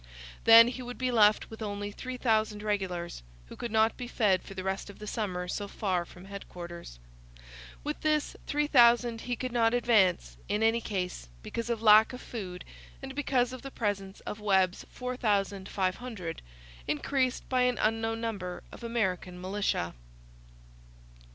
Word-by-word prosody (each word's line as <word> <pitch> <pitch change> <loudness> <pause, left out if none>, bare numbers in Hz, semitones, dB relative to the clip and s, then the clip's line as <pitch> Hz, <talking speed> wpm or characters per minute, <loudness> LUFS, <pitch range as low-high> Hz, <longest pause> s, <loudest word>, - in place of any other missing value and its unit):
Then 230 +1 +10
he 255 +1 -6
would 245 0 -7
be 255 -1 0
left 215 -2 +4
with 220 - -9
only 205 -1 -4
3,000 220 -4 -1
regulars, 185 - -2 0.2
who - - -11
could 240 - -5
not 220 0 +3
be 250 - -5
fed 205 -6 +2
for 195 - -11
the 185 - -4
rest 190 +1 -3
of 200 - -11
the 210 - -8
summer 190 -5 -3
so 205 +3 -3
far 185 -4 -1
from 180 +1 -14
headquarters. 175 - -9 0.9
With 300 +1 -4
this 305 -1 +1
3,000 240 -5 +4
he 245 - -2
could 255 +1 -4
not 230 -1 +3
advance, 190 - +2
in 210 +2 +1
any 225 +1 +3
case, 180 - -4
because 230 0 -4
of 230 -2 -2
lack 215 +2 +7
of 250 - -6
food 185 -6 -7 0.3
and 270 0 -7
because 260 -3 +1
of 255 - -7
the 275 - -7
presence 200 -5 -3
of 210 - -6
Webb's 190 -3 +1
4,500, 200 -4 -2 0.5
increased 255 - 0
by 255 -1 +1
an 250 -1 +2
unknown 225 +1 0
number 195 -6 -4
of - - -11
American 190 -6 -2
militia. 185 - -1
215 Hz, 155 wpm, -30 LUFS, 190-240 Hz, 0.9 s, Then